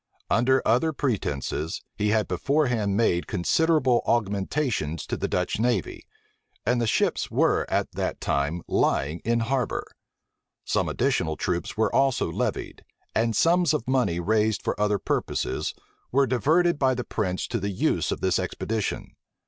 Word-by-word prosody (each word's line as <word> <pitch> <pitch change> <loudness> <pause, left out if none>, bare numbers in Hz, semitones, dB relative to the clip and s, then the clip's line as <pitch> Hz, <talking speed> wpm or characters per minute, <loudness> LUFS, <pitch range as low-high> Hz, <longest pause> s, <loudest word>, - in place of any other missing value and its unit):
Under 130 +3 +3
other 130 +8 +3
pretences 80 - -2
he 105 0 0
had 110 -1 +2
beforehand 115 - +1
made 90 -6 +1
considerable 140 - +2
augmentations 100 - -1
to - - -3
the - - -2
Dutch - - -1
navy; 125 - -1 0.6
and 120 0 +2
the 115 - +1
ships - - +1
were - - +2
at - - 0
that - - -3
time 75 +5 -1
lying 75 +5 +1
in 115 +1 +1
harbor. 125 0 -1 0.8
Some - - 0
additional 95 - 0
troops 90 +2 -2
were 110 - +1
also 135 -1 +2
levied; - - -3 0.3
and 115 0 +1
sums 170 - +3
of 120 - -4
money 125 -10 +1
raised 110 +3 +1
for - - 0
other 105 -1 +2
purposes, - - -2 0.4
were 140 +2 +4
diverted 155 +7 +2
by 130 -2 +3
the 125 - -3
prince 95 -6 -2
to 115 - -1
the 100 +1 -2
use 95 - 0
of - - -3
this 95 -1 +2
expedition. 110 -2 -3
115 Hz, 150 wpm, -25 LUFS, 95-130 Hz, 0.8 s, were